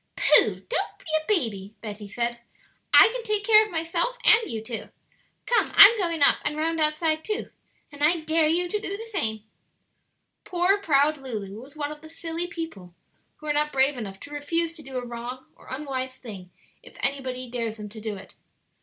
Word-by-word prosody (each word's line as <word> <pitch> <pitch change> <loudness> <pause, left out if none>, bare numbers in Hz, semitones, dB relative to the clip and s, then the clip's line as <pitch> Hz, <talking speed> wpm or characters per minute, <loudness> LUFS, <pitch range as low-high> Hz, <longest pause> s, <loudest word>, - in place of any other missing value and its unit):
"Pooh!" - - -3
said - - +8
Betty, - - -6
"don't - - -2
be - - -22
a 315 0 0
baby; 205 - -6 1.2
I - - +9
can - - -4
take 425 -2 -1
care 435 0 +7
of 430 - -6
myself 335 +9 -1
and 440 +1 +6
you 225 - -3
too. 225 +1 -6 0.6
Come, 480 - +2
I'm 415 +3 +10
going 335 -5 +1
up - - +6
and 300 - -2
round 325 +1 -1
outside 310 +1 +1
too; 430 0 -3 0.4
and 290 0 -6
I 325 +2 +3
dare 315 0 +2
you 345 +3 +1
to 420 +4 -2
do 400 -1 -5
the 450 - -8
same." 220 - -2 1.0
Poor 365 +2 +1
proud 300 -4 +2
Lulu 215 -5 -6
was 275 +4 -14
one 295 -1 -3
of 300 0 -9
the 315 - -12
silly 330 +1 -4
people 320 - -8 0.4
who 305 - -15
are 300 - 0
not 300 +1 +1
brave 270 +1 +3
enough 200 -5 -7
to 290 - -11
refuse 330 +3 -1
to 330 - -11
do 265 -3 -7
a 250 - -4
wrong 240 +2 -7
or - - -19
unwise 260 -2 -4
thing 200 -8 -10 0.3
if - - -16
anybody 260 -2 -2
dares 230 -2 -4
them 210 -1 -7
to 215 +1 -10
do 215 -1 -4
it. 195 - -12
300 Hz, 200 wpm, -25 LUFS, 245-335 Hz, 1.2 s, I'm